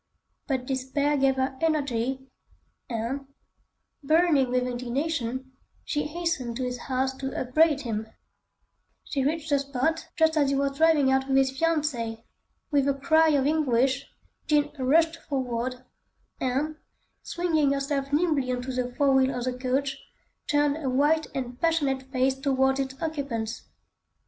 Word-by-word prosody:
But 260 Hz, -4 st, -1 dB
despair 270 Hz, +3 st, 0 dB
gave 270 Hz, -1 st, +3 dB
her 265 Hz, 0 st, -2 dB
energy, 265 Hz, -5 st, 0 dB, 0.6 s
and, 245 Hz, +4 st, -3 dB, 0.7 s
burning 310 Hz, -3 st, +3 dB
with 250 Hz, 0 st, +1 dB
indignation, 255 Hz, +1 st, -3 dB, 0.3 s
she 295 Hz, -1 st, -1 dB
hastened 300 Hz, -8 st, -2 dB
to 260 Hz, -, -2 dB
his 250 Hz, -1 st, -3 dB
house 265 Hz, +1 st, -1 dB
to 270 Hz, 0 st, -4 dB
upbraid 295 Hz, +3 st, +3 dB
him. 220 Hz, -3 st, -3 dB, 1.0 s
She 275 Hz, -3 st, -2 dB
reached 315 Hz, +2 st, -1 dB
the 285 Hz, -, +4 dB
spot 280 Hz, +4 st, -1 dB
just 320 Hz, -1 st, +3 dB
as 285 Hz, -2 st, +3 dB
he 275 Hz, -, +1 dB
was 275 Hz, 0 st, 0 dB
driving 305 Hz, -3 st, +4 dB
out 265 Hz, 0 st, +1 dB
with 270 Hz, 0 st, +2 dB
his 265 Hz, -1 st, +3 dB
fiancée. 270 Hz, -7 st, -1 dB, 0.5 s
With 280 Hz, -2 st, +3 dB
a 280 Hz, -, +2 dB
cry 320 Hz, +3 st, +4 dB
of 280 Hz, -3 st, +2 dB
anguish, 270 Hz, -3 st, +1 dB, 0.4 s
Jean 295 Hz, -1 st, +2 dB
rushed 320 Hz, +5 st, +3 dB
forward 255 Hz, -3 st, -3 dB, 0.5 s
and, 280 Hz, +5 st, -1 dB, 0.4 s
swinging 320 Hz, -5 st, +1 dB
herself 275 Hz, 0 st, -1 dB
nimbly 295 Hz, -4 st, +1 dB
on 250 Hz, 0 st, -2 dB
to 260 Hz, -, -4 dB
the 250 Hz, -1 st, -2 dB
fore 280 Hz, -2 st, +3 dB
wheel 265 Hz, -1 st, +3 dB
of 245 Hz, -, -3 dB
the 255 Hz, 0 st, -1 dB
coach, 265 Hz, +2 st, -1 dB, 0.5 s
turned 290 Hz, 0 st, +2 dB
her 285 Hz, -5 st, -2 dB
white 295 Hz, +5 st, +2 dB
and 250 Hz, -2 st, -5 dB
passionate 275 Hz, -6 st, 0 dB
face 260 Hz, 0 st, +2 dB
towards 265 Hz, 0 st, +1 dB
its 265 Hz, 0 st, -3 dB
occupants. 270 Hz, -8 st, -3 dB
270 Hz, 145 wpm, -26 LUFS, 255-295 Hz, 1.0 s, the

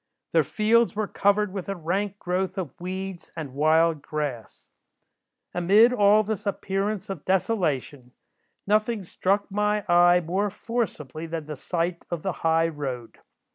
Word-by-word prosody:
Their -, -, +4 dB
fields 225 Hz, +2 st, +2 dB
were 215 Hz, -1 st, -1 dB
covered 205 Hz, 0 st, +1 dB
with 195 Hz, -1 st, -5 dB
a 195 Hz, -, -2 dB
rank 190 Hz, +4 st, -2 dB
growth 185 Hz, +1 st, -2 dB
of 180 Hz, -7 st, -4 dB
weeds 185 Hz, -1 st, -5 dB
and 145 Hz, -5 st, -5 dB
wild 155 Hz, +2 st, +3 dB
grass. 145 Hz, -8 st, -5 dB, 0.9 s
"Amid 205 Hz, +8 st, +5 dB
all 210 Hz, -1 st, +5 dB
this 215 Hz, 0 st, -4 dB
appearance 200 Hz, +1 st, -2 dB
of 175 Hz, -7 st, -7 dB
desolation, 155 Hz, -, -1 dB, 0.5 s
nothing 215 Hz, +1 st, +1 dB
struck 195 Hz, +3 st, -1 dB
my 210 Hz, 0 st, 0 dB
eye 175 Hz, 0 st, +6 dB
more 185 Hz, +5 st, -1 dB
forcibly 185 Hz, -, -4 dB
than 160 Hz, -1 st, -4 dB
the 150 Hz, 0 st, -6 dB
sight 170 Hz, +4 st, -2 dB
of 170 Hz, -3 st, -4 dB
the 190 Hz, -, 0 dB
high 165 Hz, 0 st, +3 dB
road. 135 Hz, -7 st, -6 dB
185 Hz, 140 wpm, -25 LUFS, 160-205 Hz, 0.9 s, eye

